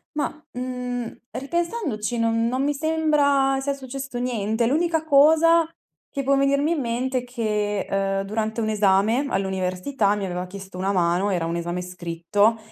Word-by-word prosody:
Mah, 295 - 0 0.2
mhmm, 250 -1 -4 0.2
ripensandoci 280 - -2
non 230 0 +2
non 255 +3 0
mi 290 0 0
sembra 290 -3 +2
sia 280 +1 -1
successo 270 -1 -6
niente. 230 -2 0
L'unica 320 +3 +1
cosa 320 +3 +5 0.4
che 275 - -2
può 275 +1 +2
venirmi 280 +2 +2
in 310 - -1
mente 250 +2 -1
è - - -8
che, 210 -4 -2
ehm, 195 0 0
durante 220 +2 -2
un 215 - 0
esame 210 +5 +3
all'università 190 +4 0
mi 200 -2 -3
aveva 180 0 -3
chiesto 190 0 -10
una 190 +2 0
mano, 180 +2 +1
era 170 -3 0
un 165 +1 -2
esame 175 +1 -3
scritto, 180 +5 0
235 Hz, 155 wpm, -24 LUFS, 195-275 Hz, 0.4 s, cosa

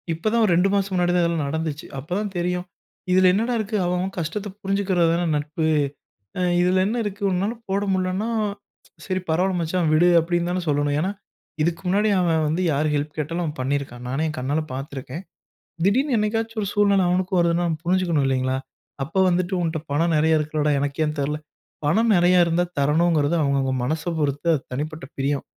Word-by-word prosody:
இப்பதான் 215 +8 +1
ஒரு 195 - +2
2 180 +3 +3
மாசம் 200 -1 0
முன்னாடி 175 -1 +2
தான் 175 -1 +3
இதெல்லாம் 170 -3 0
நடந்துச்சு. 160 0 -3
அப்ப 135 +4 -8
தான் 210 -1 -3
தெரியும், 180 +1 -1 0.5
இதில 185 0 +5
என்னடா 230 +5 0
இருக்கு. 215 0 -3
அவன், 180 +1 0
அவன் 190 +2 -3
கஷ்டத்த 170 +6 -3
புரிஞ்சுக்கிறது 195 -3 +1
தானே 175 +1 0
நட்பு. 150 +2 -2 0.7
அ - - -1 0.2
இதில 180 +1 +3
என்ன 220 +4 -1
இருக்கு, 205 0 -5
உன்னால 195 +5 0
போட 195 +1 0
முடியலன்னா, 185 +3 -1 0.8
சரி. 185 -1 -1
பரவாயில்ல 180 +3 +1
மச்சான் 170 0 0
விடு! 165 +3 +5
அப்பிடின்னு 175 +1 -1
தானே 180 0 -1
சொல்லணும். 145 0 +1
ஏன்னா, 185 +5 0 0.5
இதுக்கு 165 +2 -1
முன்னாடி 205 +4 +2
அவன் 165 -3 +2
வந்து 165 +4 0
யார் 150 +2 +1
ஹெல்ப் 150 +1 -2
கேட்டாலும் 165 +4 -2
அவன் 155 -1 -5
பண்ணியிருக்கான். 130 -2 -3
நானே, 135 +4 -1
என் 155 - -5
கண்ணால 140 +5 -1
பார்த்துருக்கேன். 135 +3 -6 0.6
திடீர்னு 255 +7 +2
என்னைக்காச்சும் 225 +1 -1
ஒரு 200 - -2
சூழ்நில 200 -2 +3
அவனுக்கும் 185 +1 +1
வருதுன்னா 170 0 +2 0.2
புரிஞ்சுக்கணும் 175 -4 +1
இல்லேங்களா! 130 0 0 0.5
அப்போ 165 +7 -4
வந்துட்டு 180 +1 0
உன்ட்ட 160 -1 -1
பணம் 165 +4 +2
நிறையா 160 +1 +3
இருக்குலடா! 150 0 0
எனக்கு 140 +1 -3
ஏன் 150 0 -1
தரல, 150 +2 -1 0.5
பணம் 220 +9 +3
நிறையா 175 +1 +4
இருந்தா 170 +1 +1 0.2
தரணுங்கிறது 155 +1 +2
அவுங்கவுங்க 140 -2 +1
மனச 155 +5 -1 0.2
பொறுத்து 145 +1 -1
அது 150 - -1
தனிப்பட்ட 150 +3 -4
பிரியம். 140 +1 -1
170 Hz, 175 wpm, -23 LUFS, 150-185 Hz, 0.8 s, இதில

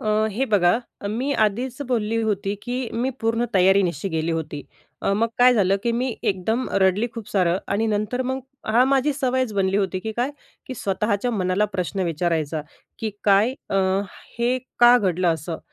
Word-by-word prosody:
अ, 215 0 +1
हे 245 +7 0
बघा 180 +1 +4 0.3
मी 250 +7 -1
आधीच 245 +6 -4
बोलली 225 -3 0
होती 200 -1 -1
की 245 +1 -3 0.2
मी 245 +3 0
पूर्ण 230 +1 +1
तयारीनिशी 190 -2 +3
गेली 160 -1 -1
होती. 155 -3 -4 0.4
अ, 195 - +1
मग 225 +3 +1
काय 250 0 +6
झालं 195 -3 +3
की 235 0 0
मी 250 +3 0 0.2
एकदम 220 +7 -2
रडली 190 +5 +3
खूप 230 -3 -7
सारं. 180 -2 +2
आणि 210 +3 0
नंतर 215 +4 -1
मग 265 - -2 0.3
हां, 230 +4 +4
माझी 275 +2 +2
सवयच 260 -3 0
बनली 195 -1 +1
होती 190 -2 0
की 220 +3 -4
काय 245 +5 -1 0.4
की 260 - -5
स्वतःच्या 205 +3 -1
मनाला 190 -1 +1
प्रश्न 185 +2 -2
विचारायचा 160 -2 -1 0.4
की 220 - -2
"काय 205 +5 +4 0.2
अ, 195 - +1 0.6
हे 245 +2 +1 0.2
का 240 +1 +8
घडलं 185 -3 +1
असं? 160 +1 -6
210 Hz, 170 wpm, -23 LUFS, 185-240 Hz, 0.6 s, का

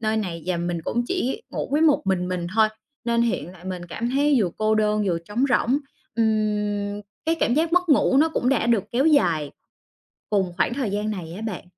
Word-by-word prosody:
nơi 220 0 0
này 175 -7 -3
và 180 -2 0
mình 170 -1 -2
cũng 240 +7 -1
chỉ 365 -9 -2
ngủ - - -3
với 295 - +3
một 305 -3 +4
mình 180 -2 0
mình 180 -2 -2
thôi. 220 -1 +5 0.4
Nên 235 0 +2
hiện 230 -6 -1
tại 180 -1 -16
mình 180 -2 -5
cảm 235 +7 -3
thấy 285 +2 +3
vừa 180 - 0
cô 215 0 +2
đơn 210 -1 +2
vừa 170 -2 +1
trống 205 +9 -2
rỗng, 255 +2 +2 0.4
ừm, 210 -2 0 0.2
cái 325 +1 +2
cảm 240 - +2
giác 320 +2 +1
mất 360 -1 +3
ngủ 275 -2 +4
nó 310 +4 +5
cũng 250 -5 -1
đã 250 -4 +2
được 230 -5 +2
kéo 265 +6 +2
dài 170 - +3 0.8
cùng 190 -4 +1
khoảng 190 +5 +1
thời 255 -7 -2
gian 210 +1 -1
này 170 -5 -5
á 210 - -7
bạn. 215 -6 -5
215 Hz, 220 wpm, -24 LUFS, 185-250 Hz, 0.8 s, thôi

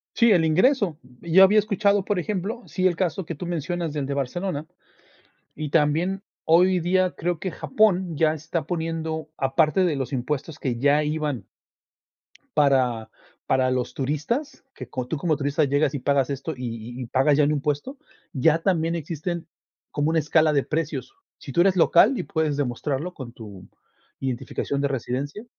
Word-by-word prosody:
Sí, 235 -2 +5
el 170 -4 +4
ingreso. 185 - +2 0.2
Yo 175 +3 +6
había 210 +3 +6
escuchado, 200 -1 +2
por 205 -2 -1
ejemplo, 210 +6 -3
sí, 185 -1 +1
el 175 - 0
caso 180 +1 -1
que 165 - -5
tú 175 - -6
mencionas 170 -1 -3
del 145 -2 -2
de 140 - -3
Barcelona, 145 +4 -3 0.9
y 150 -1 -5
también 165 +6 +1 0.2
hoy 180 +3 +4
día 185 +2 +2
creo 175 0 -1
que 185 - -3
Japón 190 - +1
ya 155 +1 +3
está 160 +1 -4
poniendo 160 -1 -3
aparte 155 +7 +2
de 165 -5 +1
los 135 +1 -4
impuestos 140 +4 -3
que 125 -4 -2
ya 145 +3 +3
iban 150 -8 -2 1.1
para, 130 -6 +2 0.4
para 130 -1 +2
los 125 -1 -1
turistas, 155 - -3
que - - -9
como 125 -1 -4
tú 150 - -2
como 155 0 0
turista 145 +2 0
llegas 145 +2 +1
y 140 - -2
pagas 140 0 +1
esto, 140 +3 -3
y, 120 0 -6
y 125 - -4
pagas 135 +4 +3
ya 150 - +5
un 145 - +2
impuesto, 150 - -2 0.4
ya 155 +4 +3
también 165 -3 +1
existen 165 +1 -4 0.4
como 145 +1 0
una 165 0 +2
escala 155 +1 +3
de 140 -2 +2
precios. 160 - -3 0.2
Sí, 140 - -9
tú 170 - +3
eres 190 0 +4
local 190 +8 +5
y - - -2
puedes 155 -3 -1
demostrarlo 145 +5 -2
con 130 -7 -8
tu 100 -5 -11 0.5
identificación 135 +2 -3
de 140 - +2
residencia 140 - -4
155 Hz, 170 wpm, -24 LUFS, 140-175 Hz, 1.1 s, Yo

